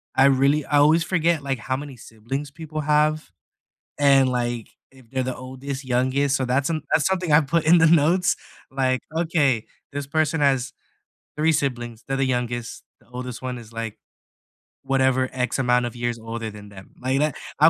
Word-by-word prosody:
I 135 - +5
really 140 +2 +3
I 145 - +1
always 155 +3 +5
forget, 170 -2 +1
like, 135 -1 -1
how 130 +4 -2
many 140 -2 -8
siblings 120 +6 -6
people 155 0 -6
have 150 -5 +1 0.7
and, 135 -2 +5
like, 120 -2 -2 0.2
if 130 -3 -19
they're 130 +1 -1
the 130 0 -3
oldest, 130 +2 -6
youngest, 130 +3 +1
so, 130 - -1
that's 130 +4 +1
an 160 -2 -1
that's 155 - +3
something 185 -4 0
I 150 - +7
put 160 +2 0
in 170 +3 +7
the 165 - +6
notes, 170 +3 +4 0.4
like, 130 -1 0 0.2
"Okay, 150 -9 +1 0.3
this 140 -1 -4
person 155 +2 0
has 135 -2 +2 0.6
3 160 +2 +3
siblings. 120 -5 -2
They're 135 - -1
the 135 - +2
youngest. 120 -2 -3 0.2
The - - -26
oldest 125 0 -7
one 125 -1 -4
is, 115 -1 -13
like, 115 -1 -5 0.9
whatever 130 -1 +2
x 125 +1 -1
amount 125 -1 +2
of 120 - -5
years 120 -1 -2
older 115 0 -5
than 105 0 -12
them." 95 -2 -13
like 130 +2 0
that 150 -2 +1 0.2
I - - +8
135 Hz, 185 wpm, -23 LUFS, 125-150 Hz, 0.9 s, I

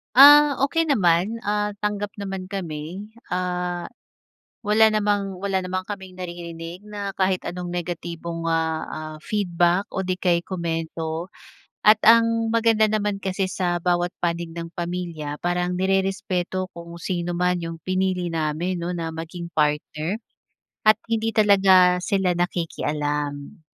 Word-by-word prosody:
Ah, 290 +1 +8
okey 330 +4 +2
naman, 205 - +2
ah, 210 0 -1
tanggap 205 0 -2
naman 195 -2 -4
kami. 185 +1 -6 0.2
Ah, 180 -1 -2 0.7
wala 215 +2 +5
namang 205 -2 +1
wala 195 -1 +1
naman 185 0 -2
kaming 190 -2 -8
naririnig 175 +1 -7
na 205 -1 -4
kahit 190 -1 +1
anong 180 0 -6
negatibong, 170 -1 -4
ah, 160 -1 0
ah, 155 0 -6
feedback 175 0 0
o 190 -1 -3
di 185 - +1
kaya'y 175 -2 +1
komento. 165 -2 -3 0.5
At 215 0 +7
ang 230 0 +5
maganda 225 -1 +4
naman 205 -1 0
kasi 190 0 -1
sa 175 -1 -1
bawat 175 0 +1
panig 170 -1 -2
ng 170 0 -6
pamilya 170 -4 -4
parang 175 0 0
nirerespeto 190 -1 0
kung 170 0 -9
sino 175 -1 -2
man 180 +1 +1
'yong 165 -1 -6
pinili 185 0 0
namin 165 +2 -1
'no 180 - -2
na 165 -2 -3
maging 165 +2 -6
partner 155 +6 0 0.7
at 215 - +8 0.2
hindi 225 0 0
talaga 190 -4 +5
sila 190 0 +1
nakikialam. 150 -3 -2
180 Hz, 130 wpm, -23 LUFS, 170-200 Hz, 0.7 s, Ah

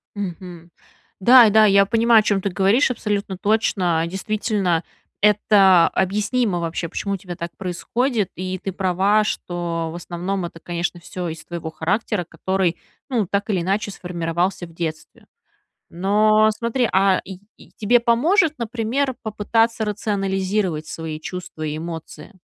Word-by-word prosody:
Мгм. 175 -3 -7 0.5
Да, 240 +3 +8
да, 215 +1 +6
я 200 -1 +5
понимаю, 230 +2 +4
о - - +1
чём 200 -2 +1
ты 200 - -1
говоришь, 200 +9 +2
абсолютно 205 -5 -3
точно. 185 -5 +1
Действительно, 195 -2 -1 0.4
это 200 -4 +5
объяснимо 205 +1 0
вообще, 170 0 -3
почему 200 +4 -3
у - - -5
тебя 180 -1 -8
так 170 -1 -6
происходит, 210 +4 -1
и 185 +1 -4
ты 195 - -5
права, 195 +3 +2
что 170 -4 -3
в - - -8
основном 175 +2 -4
это, 170 -1 -9
конечно, 175 +1 -3
всё 180 +1 -6
из-за 160 -1 -7
твоего 170 -2 -6
характера, 190 +5 -1
который, 185 -1 -1 0.3
ну, 230 -7 0
так 200 +3 -2
или 190 -4 +1
иначе, 200 +4 -1
сформировался 175 0 -2
в 165 - -15
детстве. 160 -2 -6 0.7
Но 215 +4 +3
смотри, 235 +2 -1
а, 190 0 +3
и 190 -1 -9 0.2
и - - -18
тебе 235 +3 +3
поможет, 305 - +3
например, 240 +4 -1
попытаться 225 +1 0
рационализировать 195 -5 -1
свои 160 -1 -6
чувства 180 -1 -7
и 150 0 -3
эмоции? 165 +4 -8
195 Hz, 145 wpm, -21 LUFS, 175-215 Hz, 0.7 s, Да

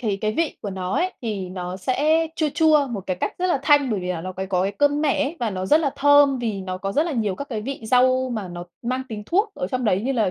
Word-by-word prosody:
thì 215 -6 -1
cái 215 +2 -1
vị 325 +5 -1
của 205 - -4
nó 185 0 -3
ấy 370 +1 0
thì 205 -5 -3
nó 180 0 -5
sẽ 300 - +1
chua 310 - +1
chua 310 -3 +4
một 225 -5 -4
cái 185 - -1
cách - - -1
rất 365 - +1
là 350 -6 +1
thanh 285 -4 +4
bởi 205 - -1
vì 180 0 -2
nó 185 - -4 0.2
có 180 -1 +2
cái 195 - -1
cơm 290 +6 +2
mẻ 290 -1 +2
ấy 315 +5 -4
và 230 - 0
nó 185 -1 -3
rất 305 +9 +5
là 285 -4 0
thơm 285 -1 +5
vì 220 -5 -2
nó 185 0 -5
có 195 +1 -3
rất 300 - +3
là 325 - -2
nhiều 215 -6 -1
các 280 +8 -7
cái 220 -4 -4
vị 270 +2 -5
rau 255 +2 +3
mà 215 -5 -4
nó 175 0 -7 0.2
mang 255 +2 -2
tính 215 -2 -6
thuốc 405 +5 +1
ở - - -3
trong 250 +5 -2
đấy 200 -1 +2
như 270 +2 0
là 220 -7 +1
245 Hz, 290 wpm, -23 LUFS, 195-290 Hz, 0.2 s, rất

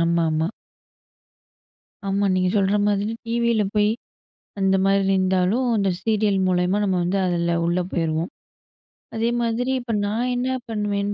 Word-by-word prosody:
ஆமாமா. 165 -1 +1 1.6
ஆமா, 195 +1 0
நீங்க 185 0 +2
சொல்ற 200 0 +2
மாதிரி 205 +1 0
டிவில 235 -1 +1
போயி, 210 0 +3 0.7
அந்த 195 0 +3
மாதிரி 195 0 +3
இருந்தாலும், 190 +6 +1
அந்த 195 -2 +1
சீரியல் 210 -1 +1
மூலியமா 180 +2 +1
நம்ம 190 -2 +1
வந்து 185 +3 0
அதுல 170 -1 0
உள்ள 175 +2 +1
போயிருவோம். 165 0 -1 0.9
அதேமாதிரி 235 +2 0
இப்ப 240 -2 -4
நான் 230 +5 -1
என்ன 245 +1 -1 0.2
பண்ணுவேன்னு 205 -2 -1
200 Hz, 125 wpm, -23 LUFS, 180-220 Hz, 1.6 s, போயி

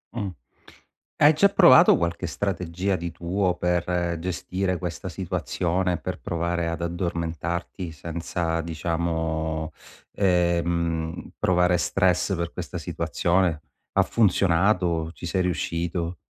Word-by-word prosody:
Mh, 105 -5 -2 0.9
hai 150 +2 +6
già 200 +6 +4
provato 175 -2 +7
qualche 85 +1 -2
strategia 90 +3 -2
di 85 -1 -4
tuo 90 +2 -1
per 90 0 0
gestire 90 +1 -2
questa 85 -2 -5
situazione, 90 0 -1
per - - -5
provare 85 0 -2
ad 85 0 -3
addormentarti 85 0 -3
senza 85 +1 -3
diciamo, 80 -1 -2 0.4
ehm, 85 -3 0
provare 90 -1 +3
stress 95 +2 +1
per 85 -1 -3
questa - - -5
situazione. 85 -3 0 0.3
Ha - - +4
funzionato? 90 -5 +2
Ci - - -9
sei 90 +2 0
riuscito? 85 0 -2
85 Hz, 105 wpm, -25 LUFS, 85-90 Hz, 0.9 s, provato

